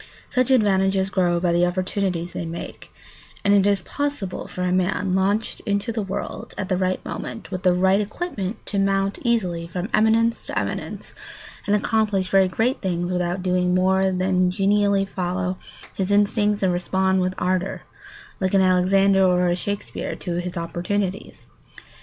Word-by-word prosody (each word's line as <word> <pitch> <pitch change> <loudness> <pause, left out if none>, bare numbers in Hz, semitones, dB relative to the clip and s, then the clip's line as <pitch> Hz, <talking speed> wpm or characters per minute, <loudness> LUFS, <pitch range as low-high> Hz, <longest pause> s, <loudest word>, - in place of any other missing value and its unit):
Such 255 0 +1
advantages 195 -5 +2
grow 175 -2 +2
by 175 -1 +1
the 175 +1 +3
opportunities 180 -1 -1
they - - -4
make; 165 +1 -8 0.5
and 200 - +5
it 200 -1 +4
is 200 -3 +1
possible 285 -7 -3
for 180 - -5
a 180 - 0
man 185 +1 0
launched 200 +4 0
into 200 +3 -1
the 225 -1 -2
world 195 -1 -5
at 190 - -4
the 185 - +2
right 185 0 -1
moment 225 - -6
with 185 -1 -3
the 180 -2 +3
right 190 +2 +3
equipment 210 - -4
to 200 - -2
mount 195 0 +1
easily 185 -9 0
from 180 +4 -4
eminence 225 +2 +2
to - - -4
eminence - - -4 0.5
and 205 - +3
accomplish 210 -3 0
very 195 -1 +5
great 225 +8 0
things 175 -2 -1
without 180 0 -1
doing 180 -1 +1
more 190 +1 +3
than 185 0 +1
genially 200 +1 +2
follow 185 -1 -3 0.3
his 190 0 -2
instincts 205 0 +2
and 185 -2 +3
respond 190 +1 +1
with 185 0 -1
ardour, 185 +1 -1 0.6
like 190 0 0
an 195 - +5
Alexander 190 +1 +4
or 180 -1 +3
a 175 - +2
Shakespeare, 200 +3 -4
to 175 -2 -4
his 175 0 -4
opportunities. 180 +4 -3
190 Hz, 165 wpm, -23 LUFS, 180-200 Hz, 0.6 s, and